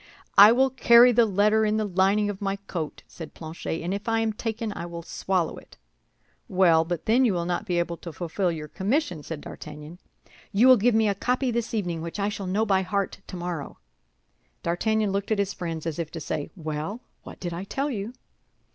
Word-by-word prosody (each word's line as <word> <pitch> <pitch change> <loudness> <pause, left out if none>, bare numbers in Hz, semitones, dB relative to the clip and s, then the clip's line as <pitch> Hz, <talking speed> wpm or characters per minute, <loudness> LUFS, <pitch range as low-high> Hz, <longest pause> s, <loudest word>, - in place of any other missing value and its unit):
"I 205 +2 +10
will 265 +2 +3
carry 245 -1 +7
the 235 -1 +4
letter 210 +2 +3
in 215 0 +1
the 215 - 0
lining 195 +2 +2
of 205 -1 -5
my 195 -1 -1
coat," 180 -6 -6
said 160 -3 -10
Planchet; 160 0 -5
"and 175 +3 -2
if 205 +3 -4
I 225 0 +2
am 220 -1 0
taken 220 0 -3
I - - -6
will 170 -1 -7
swallow 180 -1 -1
it." - - -15 0.7
"Well, 175 -4 +4
but 170 -1 -4
then 240 +4 +4
you 220 -7 +2
will 170 -1 -1
not 180 +4 -2
be 175 -2 0
able 170 0 -1
to 170 - -8
fulfill 175 +3 -2
your 155 -2 -6
commission," 190 - -1
said 150 0 -7
D'Artagnan. 150 +3 -10 0.5
"You 220 +6 +5
will 255 -1 +8
give 230 +2 +3
me 220 -1 +3
a 200 - +2
copy 250 +5 0
this 235 0 -2
evening, 175 -6 -2
which 170 +5 -6
I 200 +1 +1
shall 200 -2 -5
know 205 +4 +1
by 195 -2 +2
heart 200 +1 -2
tomorrow." 175 -5 -5 0.9
D'Artagnan 210 +5 0
looked 200 0 -2
at 215 - +2
his 200 0 0
friends, 165 -2 -5
as 165 -1 -3
if 165 -2 -3
to 165 - -5
say, 150 -1 -4
"Well, 160 +6 -4 0.2
what - - -11
did 175 -2 -4
I 175 +2 -5
tell 275 +8 -2
you?" 215 0 -4
195 Hz, 210 wpm, -26 LUFS, 170-220 Hz, 0.9 s, I